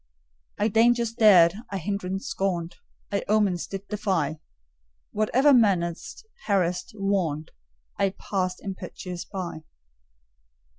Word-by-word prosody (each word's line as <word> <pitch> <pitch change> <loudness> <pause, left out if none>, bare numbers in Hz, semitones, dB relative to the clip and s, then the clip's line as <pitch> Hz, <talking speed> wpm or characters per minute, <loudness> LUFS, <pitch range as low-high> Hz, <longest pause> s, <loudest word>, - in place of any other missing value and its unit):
I 210 - +2
dangers 230 +1 +3
dared; 190 -7 +6 0.2
I 195 - -3
hindrance 190 +1 -3
scorned; 185 -6 -2 0.3
I 200 - -1
omens 205 -5 +1
did 195 0 -7
defy: 190 -8 -1 0.7
Whatever 255 +7 +3
menaced, 190 - +1 0.2
harassed, 180 0 0
warned, 185 -7 -1 0.5
I 195 -1 +1
passed 185 -2 -2
impetuous 185 -2 -6
by. 185 -5 -5
195 Hz, 100 wpm, -26 LUFS, 180-210 Hz, 0.7 s, dared